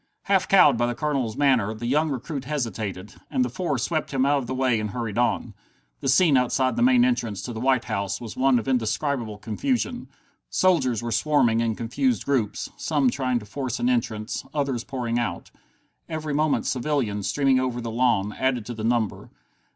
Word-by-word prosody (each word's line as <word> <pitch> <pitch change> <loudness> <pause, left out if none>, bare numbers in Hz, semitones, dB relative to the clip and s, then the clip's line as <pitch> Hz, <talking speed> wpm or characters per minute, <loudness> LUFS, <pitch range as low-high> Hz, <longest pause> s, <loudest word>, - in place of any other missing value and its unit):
Half 195 -2 +2
cowed 150 -11 +6
by 120 - +2
the 120 - -2
Colonel's 135 -7 -1
manner, 125 -7 +2
the 115 +2 -6
young 150 +6 +2
recruit 135 +1 -4
hesitated, 110 -9 -4 0.2
and 255 -1 +1
the - - -5
four 175 -7 -1
swept 155 +6 -1
him 135 -1 +1
out 145 0 +3
of 125 - -6
the 130 - -3
way 130 -3 +2
and 105 0 -3
hurried 115 -1 -3
on. 120 - 0 0.5
The - - -1
scene 145 +1 +5
outside 130 +1 +1
the - - -1
main 250 0 +5
entrance 115 - -1
to 120 - -5
the 110 - -5
White 130 0 +2
House 100 -3 -2
was 115 -3 -8
one 130 -1 +3
of 115 - -3
indescribable 120 -2 -1
confusion. 245 - -2 0.4
Soldiers 130 - +2
were 120 - -3
swarming 120 -1 +2
in 115 -1 0
confused 230 - -1
groups, 120 -7 -1
some 145 -5 +1
trying 130 -2 0
to 110 - -6
force 130 +3 -4
an 245 - +1
entrance, 110 - -1
others 135 -5 -1
pouring 120 -3 -2
out. 95 -8 -4 0.6
Every 155 -2 -3
moment 150 0 +1
civilians, 120 -7 -1
streaming 135 -2 +2
over 130 -2 -1
the 115 -1 -4
lawn, 110 -4 +1
added 130 -4 -1
to 120 - -5
the 110 -2 -6
number. 115 -2 -1
125 Hz, 190 wpm, -24 LUFS, 115-145 Hz, 0.6 s, cowed